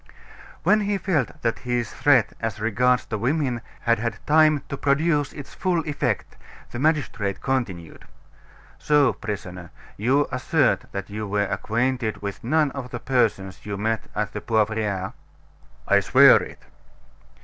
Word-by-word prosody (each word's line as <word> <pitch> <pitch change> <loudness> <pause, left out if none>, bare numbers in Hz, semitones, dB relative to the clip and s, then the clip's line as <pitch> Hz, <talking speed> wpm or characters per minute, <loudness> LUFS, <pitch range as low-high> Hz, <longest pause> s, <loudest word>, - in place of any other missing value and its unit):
When 215 - +4
he 205 -1 0
felt 155 - -2
that 115 -1 0
his 120 -2 -2
threat 130 -6 +3
as 115 -2 -3
regards 125 +3 +2
the 110 - -4
women 130 0 0 0.2
had 115 -1 +2
had 115 +1 -2
time 155 -1 +4
to - - -3
produce 145 +1 +1
its 145 -3 -10
full 175 -4 -1
effect, 145 - -2 0.3
the 120 - -5
magistrate 130 -10 0
continued: 100 -11 -3 0.7
"So, 145 -3 +3
prisoner, 90 -4 -6 0.3
you 130 +7 +2
assert 130 +2 +1
that 100 0 -6
you 105 0 -4
were 100 +1 0
acquainted 120 +2 -1
with 100 -1 -6
none 150 +3 +2
of 130 -2 -6
the 120 - -5
persons 110 -8 0
you 100 -1 -5
met 110 +2 -1
at 105 0 -2
the 105 - -5
Poivriere." 105 -3 -1 0.7
"I - - +5
swear - - +6
it." - - -10
120 Hz, 145 wpm, -24 LUFS, 105-145 Hz, 0.7 s, swear